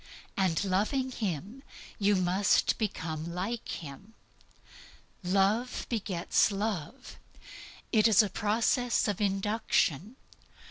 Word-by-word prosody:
And 190 -2 +1
loving 215 +8 0
Him, 205 - -4 0.4
you 205 0 +3
must 185 +1 +2
become 165 -6 -3
like 215 +6 -4
Him. 170 +9 -8 1.1
Love 195 +6 +1
begets 200 -4 +1
love. 205 - -4 0.7
It 220 -1 +5
is 215 -1 +6
a 205 - -2
process 230 +4 +1
of 205 -1 -2
induction. 200 - 0
205 Hz, 95 wpm, -29 LUFS, 185-225 Hz, 1.1 s, is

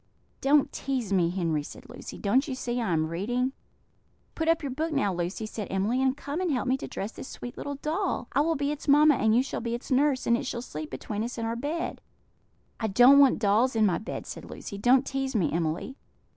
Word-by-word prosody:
"Don't 280 +1 +3
tease 255 -7 -2
me, 175 -3 +3
Henry," 170 -4 -1
said 145 - -11
Lucy; - - -9
"don't 255 +8 +2
you 265 - -3
see 245 -1 -2
I 220 - -1
am 160 -1 +2
reading?" 245 +11 -1 0.8
"Put 320 - -2
up 330 -1 +2
your 275 - -3
book 315 +5 -2
now, 205 -10 +1
Lucy," 175 +5 -3
said 215 -1 -5
Emily, 210 +7 0
"and 265 +1 +1
come 290 +5 -4
and 360 -3 0
help 260 -1 -1
me 260 - +3
to - - -6
dress 200 +3 -5
this - - -9
sweet 245 - -8
little 285 - -5
doll. 310 -1 -2
I 280 - +2
will 325 +2 +1
be 285 0 -1
its 300 0 -6
mamma, 300 +2 +6
and 220 -4 +2
you 250 - +4
shall 270 - -4
be 235 0 -2
its 240 - -9
nurse, 270 0 +2
and 235 - +4
it 260 +2 -3
shall 240 -1 -4
sleep 155 -9 -6
between 205 +11 -4
us 240 +2 -5
in 230 - -2
our 230 +1 -2
bed." 295 +7 -3 0.8
"I 220 - 0
don't 245 +7 +7
want 275 -2 +6
dolls 225 +4 +2
in 220 -1 +4
my 185 -4 +2
bed," 220 - -6
said - - -8
Lucy; 200 - -7
"don't 255 +5 +4
tease 270 -2 -2
me, 185 -7 +2
Emily." 170 - -2
245 Hz, 235 wpm, -27 LUFS, 205-280 Hz, 0.8 s, don't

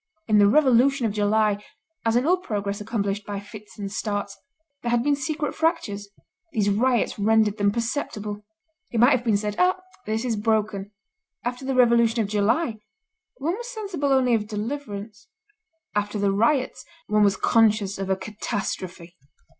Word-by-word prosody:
In 215 -2 +4
the 205 - +6
Revolution 265 +1 +4
of 220 - +1
July, 210 0 +1 0.4
as 225 0 +2
in 245 +2 +3
all 360 +4 +4
progress 205 - -3
accomplished 205 -2 -2
by 200 0 -5
fits 210 +1 -12
and 200 -2 -5
starts, 205 0 -3 0.5
there 240 - -2
had 240 0 +2
been 290 +1 +3
secret 295 +2 -2
fractures; 215 - -1 0.4
these 205 -6 +1
riots 240 +1 +1
rendered 215 0 +3
them 205 0 +3
perceptible. 215 -3 -3 0.5
It 230 - -2
might 245 +4 +6
have 250 -3 +2
been 220 -4 +2
said: 210 0 -3
'Ah! 365 +1 +3 0.3
this 220 +3 -1
is 230 -3 0
broken.' 210 -2 0 0.6
After 245 +2 -3
the 265 0 -1
Revolution 235 -2 +4
of 210 -3 0
July, 220 +4 +1 0.6
one 325 +6 -1
was 480 +3 -7
sensible 390 - -2
only 260 -2 +3
of 210 -2 +1
deliverance; 215 -2 -5 0.7
after 205 +1 -1
the 200 -1 +2
riots, 245 +7 +1 0.2
one 210 0 +2
was 200 -1 +3
conscious 215 -3 +2
of 195 0 -3
a 190 - +3
catastrophe. 185 -4 -5
220 Hz, 160 wpm, -24 LUFS, 205-250 Hz, 0.7 s, the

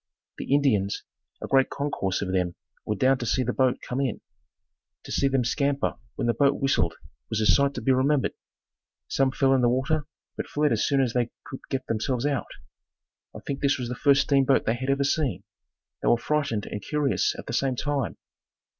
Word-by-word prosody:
The - - -5
Indians, 120 -9 +2 0.4
a - - -3
great 135 -1 +3
concourse 100 -10 -2
of 95 - -3
them 90 -2 0 0.3
were 105 - 0
down 130 +4 +3
to 120 - -3
see 130 - +1
the 125 0 -1
boat 130 -2 +2
come 130 +2 -1
in. 130 -5 -1 0.8
To - - -9
see 140 - +2
them 135 -3 +1
scamper 140 +2 0 0.2
when - - -2
the 120 - +2
boat 140 +5 +2
whistled 110 -12 +1 0.3
was 110 - -1
a 110 - +1
sight 140 +5 +3
to 125 - -4
be 135 - +3
remembered. 130 +2 +2 0.7
Some 135 -1 +2
fell 135 0 +2
in 130 - +3
the 120 - +4
water, 145 +4 0 0.3
but - - -4
fled 150 0 +1
as 115 -1 +1
soon 140 -2 +3
as 125 -4 0
they 120 -2 +1 0.2
could 130 - -7
get 135 -1 -2
themselves 120 +3 -1
out. 140 -3 -1 0.9
I - - -8
think 140 - -3
this 140 0 +2
was 125 -2 -4
the - - -2
first 140 +2 +4
steamboat 135 -1 +3
they 110 - +2
had 130 +3 -4
ever 140 0 +2
seen. 135 - 0 0.6
They - - -2
were 120 - +5
frightened 140 -6 -1
and 105 - -5
curious 150 +3 0
at - - -8
the - - -6
same 130 +1 +1
time. 140 -1 -2
130 Hz, 205 wpm, -26 LUFS, 120-140 Hz, 0.9 s, were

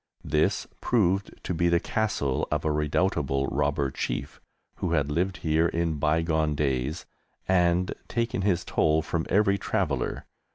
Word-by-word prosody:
This 75 +1 +1 0.2
proved 100 -4 +1
to - - -2
be 85 +1 +2
the 85 0 +3
castle 90 -12 -1
of 75 0 -1
a 80 - +2
redoubtable 75 -2 0
robber 70 -1 0
chief, - - -4 0.4
who 85 - -1
had 75 -3 +1
lived 90 +4 0
here 80 +1 +3
in 85 -2 -1
bygone 80 0 +1
days 70 +2 -1 0.4
and 90 0 +2
taken 115 -4 -1
his 95 -3 +1
toll 80 0 +2
from 80 0 -2
every 100 -1 +3
traveller. 75 - -1
80 Hz, 140 wpm, -27 LUFS, 75-90 Hz, 0.4 s, the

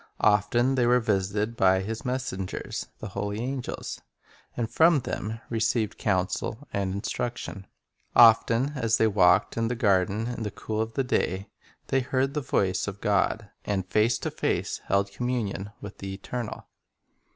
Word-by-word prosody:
Often 105 +5 +3
they 125 -2 +2
were 125 +1 +5
visited 105 0 0
by 95 -2 +4
His 110 +3 -4
messengers, 125 -7 -3
the 105 - -7
holy 100 +2 -3
angels, 130 +1 -4 0.6
and 120 -2 0
from 160 +4 +4
them 110 0 -4
received 110 -1 0
counsel 100 +7 -1
and 100 -1 -1
instruction. 100 -1 -4 0.5
Often 115 +3 +6
as 115 -4 +1
they 110 - +4
walked 95 -3 +4
in 115 0 +1
the 125 - -1
garden 100 -2 +2
in 120 -1 -4
the 105 - -2
cool 110 +2 -3
of 110 0 -4
the 135 - +1
day 100 -6 -1 0.4
they 135 - +3
heard 130 +1 0
the 150 - -1
voice 95 -7 0
of 100 -1 -5
God, 105 +1 0
and 95 -3 -1
face 110 +5 +2
to - - -4
face - - -1
held 100 0 +1
communion 105 -3 -2
with 100 - -9
the 95 0 -5
Eternal. 115 +3 -5
110 Hz, 155 wpm, -27 LUFS, 100-120 Hz, 0.6 s, Often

